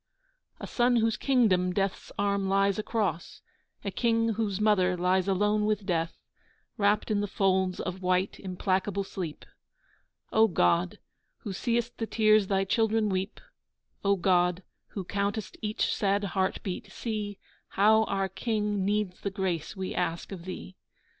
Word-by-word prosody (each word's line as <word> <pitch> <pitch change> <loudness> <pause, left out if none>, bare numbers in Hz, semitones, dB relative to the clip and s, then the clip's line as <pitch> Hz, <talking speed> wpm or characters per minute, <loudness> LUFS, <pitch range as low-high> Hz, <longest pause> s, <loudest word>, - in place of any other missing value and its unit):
A - - -5
Son 245 0 +2
whose 225 -1 +2
kingdom 195 -9 +2
Death's 195 0 -2
arm 200 -1 0
lies 195 +1 +2
across, 210 -5 -2 0.4
A - - -1
King 230 -1 +1
whose 215 -3 -1
Mother 190 -4 +3
lies 180 +1 +2
alone 210 +2 +2
with 210 -2 0
Death 165 -3 -1 0.6
Wrapped 205 +1 +1
in 205 -1 +2
the 205 - -1
folds 190 -2 +1
of 180 +1 -4
white 185 +1 0
implacable 190 +1 -1
sleep. 180 -5 -6 0.9
O 220 0 +5
God, 90 - +2 0.4
who 200 - -5
seest 235 +3 -1
the 225 - -2
tears 215 -2 +4
Thy 195 -1 +2
children 220 +1 +2
weep, 190 +2 -2 0.6
O 200 0 +3
God, 180 -1 +2 0.2
who 195 - -6
countest 200 +2 -2
each 215 0 0
sad 200 0 +1
heart 190 -1 0
beat, 190 +1 -5
see 210 -3 -4 0.4
How 220 +2 +5
our 195 -2 -1
King 210 0 -1
needs 205 -2 -1
the 200 - -1
grace 190 -3 -2
we 190 -1 -4
ask 170 0 -2
of 180 -3 -7
Thee! 185 0 -8
200 Hz, 145 wpm, -28 LUFS, 185-215 Hz, 0.9 s, O